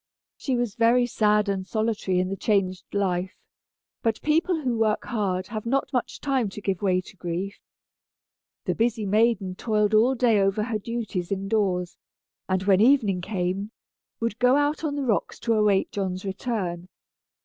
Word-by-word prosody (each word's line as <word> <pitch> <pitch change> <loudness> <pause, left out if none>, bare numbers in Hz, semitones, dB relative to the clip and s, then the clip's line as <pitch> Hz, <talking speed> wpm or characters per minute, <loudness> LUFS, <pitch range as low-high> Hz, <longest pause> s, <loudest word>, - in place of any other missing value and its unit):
She 265 - -2
was 240 -4 -1
very 235 +2 +4
sad 210 -3 +2
and 190 -1 -2
solitary 215 -4 0
in 185 0 0
the 195 - -2
changed 190 -2 0
life, 185 -2 -1 0.7
but 225 -1 0
people 320 +2 +2
who 250 -3 0
work 215 -1 +1
hard 190 -5 -1
have 215 -2 -4
not 270 +4 -1
much 250 - -2
time 265 -6 0
to 195 - -8
give 195 -3 -2
way 185 -2 +2
to 190 - -15
grief. 180 +2 -4 1.1
The - - +1
busy 225 -1 0
maiden 210 -2 +2
toiled 210 +1 0
all 235 +5 +4
day 230 -4 +3
over 195 +2 +1
her 220 -1 -2
duties 210 -5 -4
in 195 0 -2
doors, 190 -4 0 0.5
and 185 0 +1
when 195 0 +4
evening 220 -7 +4
came, 190 +1 -2 0.5
would 230 -1 -2
go 250 +1 +5
out 290 +2 +1
on 295 -2 -1
the 285 -2 -2
rocks 220 -5 0
to 230 -1 +1
await 210 -3 +2
John's 190 -1 -3
return. 190 -4 -3
210 Hz, 170 wpm, -25 LUFS, 190-235 Hz, 1.1 s, go